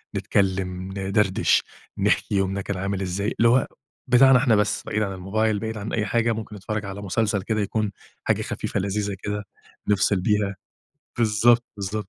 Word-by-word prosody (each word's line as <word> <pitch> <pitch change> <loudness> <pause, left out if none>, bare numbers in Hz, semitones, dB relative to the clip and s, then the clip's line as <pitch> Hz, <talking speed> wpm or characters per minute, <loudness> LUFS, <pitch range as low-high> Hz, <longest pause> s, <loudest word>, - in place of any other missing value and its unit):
نتكلّم، 95 -1 -1
ندردش، 95 0 +2 0.3
نحكي - - +1
يومنا 95 0 0
كان 100 0 -4
عامل 100 +1 -2
إزاي، 100 +3 -2
اللي 115 - +5
هو 125 +2 +3 0.4
بتاعنا 130 +1 +7
إحنا 125 -3 +3
بس 105 -1 +1
بعيد 105 - -1
عن 100 -2 -3
الموبايل 105 +3 0
بعيد 110 0 -4
عن 105 +1 -5
أي 110 -2 0
حاجة، 115 +3 +1
ممكن 110 -1 -6
نتفرّج 105 +1 -4
على 100 +1 -6
مسلسل 105 +1 0
كده 110 0 -1
يكون 105 0 -1 0.3
حاجة - - +1
خفيفة - - -3
لذيذة 100 +1 -2
كده، 105 0 -3 0.4
نفصل 100 -2 +2
بيها، 105 0 +1 0.6
بالضبط، 115 +1 +4
بالضبط. 100 +1 -4
105 Hz, 165 wpm, -24 LUFS, 95-110 Hz, 0.6 s, بتاعنا